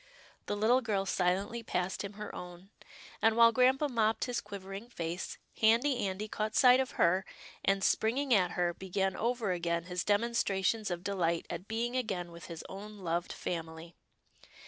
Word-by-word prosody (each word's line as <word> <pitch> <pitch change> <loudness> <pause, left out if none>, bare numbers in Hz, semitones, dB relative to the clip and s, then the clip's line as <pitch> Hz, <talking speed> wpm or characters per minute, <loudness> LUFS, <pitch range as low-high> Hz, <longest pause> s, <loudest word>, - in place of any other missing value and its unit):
" - - -28
The 205 - -1
little 235 +5 +4
girl 205 -5 -1
silently 195 +5 0
passed 185 -4 -2
him 200 0 -6
her 210 0 -7
own, 180 +2 -9 0.5
and 225 0 +3
while 230 0 +8
grampa 260 +4 +3
mopped 225 -4 +1
his 245 -1 -2
quivering 200 +2 -8
face, 170 -4 -4 0.2
Handy 235 +1 +3
Andy 190 +3 -4
caught 215 0 -3
sight 250 -1 +7
of 260 -1 -1
her, 185 +3 +3 0.4
and, 195 0 +2
springing 255 +7 +2
at 180 -4 +3
her, 175 -1 +1
began 190 +1 -2
over 235 -3 0
again 170 -1 -1
his 180 0 -3
demonstrations 210 -1 +1
of 175 0 -4
delight 170 -4 0
at 175 +3 -6
being 235 +3 -2
again 190 -9 -2
with 170 0 -10
his 165 -2 -7
own 210 +2 -9
loved 175 -2 -2
family. 165 0 -5
200 Hz, 170 wpm, -32 LUFS, 180-230 Hz, 0.5 s, while